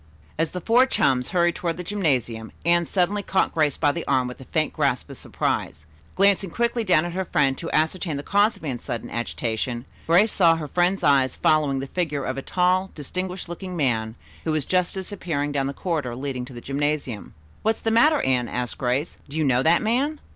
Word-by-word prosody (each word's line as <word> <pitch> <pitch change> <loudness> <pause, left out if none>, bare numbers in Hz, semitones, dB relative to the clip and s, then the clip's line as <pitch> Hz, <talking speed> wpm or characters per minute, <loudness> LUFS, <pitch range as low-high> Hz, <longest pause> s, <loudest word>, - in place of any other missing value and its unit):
As 160 0 0
the 180 - -6
four 240 +7 +4
chums 130 - +1
hurried 175 -1 +2
toward 170 -1 -3
the 180 - -5
gymnasium, 130 - -1
Anne 170 -1 +3
suddenly 195 +2 +1
caught 190 -1 0
Grace 150 -4 +1
by 145 -2 +3
the 170 +2 -4
arm 130 -2 +2
with 125 +1 -8
a - - -10
faint 155 +2 -1
gasp 140 -2 0
of 135 - -9
surprise. 75 - -3 0.3
Glancing 195 -1 +3
quickly 235 +4 0
down 175 -5 +3
at 175 - -4
her 190 +1 -1
friend 140 -5 +2
to 165 - -5
ascertain 160 0 0
the 140 - -5
cause 205 +5 +2
of - - -18
Anne's 125 -4 -4
sudden 115 - -5
agitation, 120 +1 -3 0.2
Grace 185 +7 +5
saw 170 -3 +5
her 160 -2 -5
friend's 180 +5 +1
eyes 135 -3 +3
following 150 -3 +2
the - - -4
figure 150 -2 -2
of 130 - -2
a 135 - -4
tall, 185 +4 +1
distinguished 180 +5 -5
looking 180 +2 -6
man 115 -6 0 0.3
who 160 - -1
was 155 -3 0
just 180 0 +1
disappearing 175 -7 -3
down 135 -1 0
the - - -2
corridor 145 -6 -3
leading 130 -1 -4
to 130 - -11
the 120 - -8
gymnasium. 140 -5 -3 0.3
"What's 220 +1 0
the 225 - 0
matter, 295 +7 +4
Anne?" 125 -2 +1
asked 125 0 -4
Grace. 130 +4 -1
"Do 145 - -6
you 160 - +2
know 130 -3 +3
that 165 +7 +3
man?" 270 +7 0
155 Hz, 210 wpm, -24 LUFS, 135-185 Hz, 0.3 s, Grace